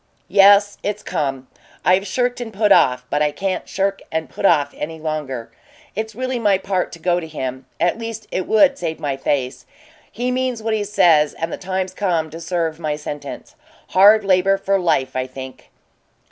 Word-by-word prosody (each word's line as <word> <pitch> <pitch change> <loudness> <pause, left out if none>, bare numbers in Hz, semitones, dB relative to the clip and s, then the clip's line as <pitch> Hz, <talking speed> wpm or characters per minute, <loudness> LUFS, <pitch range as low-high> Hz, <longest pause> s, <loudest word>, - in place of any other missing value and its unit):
"Yes, 200 +1 +6
it's 210 0 -3
come. 135 -3 -3 0.4
I've 185 +2 +3
shirked 245 +4 -1
and 230 -2 -5
put 210 0 +1
off, 125 -7 +4
but 145 - +1
I 150 0 +2
can't 190 +5 -3
shirk 195 0 -1
and 160 0 -3
put 200 - +1
off 145 -4 +2
any 160 +2 -6
longer. 150 -6 -4 0.4
It's 220 0 -4
really 255 0 -2
my 205 -4 +3
part 190 -1 -2
to - - -8
go 175 +1 +1
to 165 - -7
him 130 -4 -5
at 175 +6 +1
least 225 -1 -6
it 185 - -2
would 275 +5 +4
save 160 -2 -3
my 140 -2 -2
face. 130 -1 -2 0.4
He 245 +2 -2
means 255 -3 -2
what 225 0 0
he 215 -1 0
says, 160 -7 +3
and 165 0 -4
the - - -1
time's 185 0 -3
come 170 -6 -1
to 165 +2 -8
serve 165 -1 -2
my 155 -2 -2
sentence. 150 -1 -7 0.4
Hard 205 +2 +6
labor 195 +1 +3
for 195 0 0
life, 135 -7 0
I 130 0 -1
think." 130 0 -10
180 Hz, 190 wpm, -20 LUFS, 150-205 Hz, 0.4 s, Yes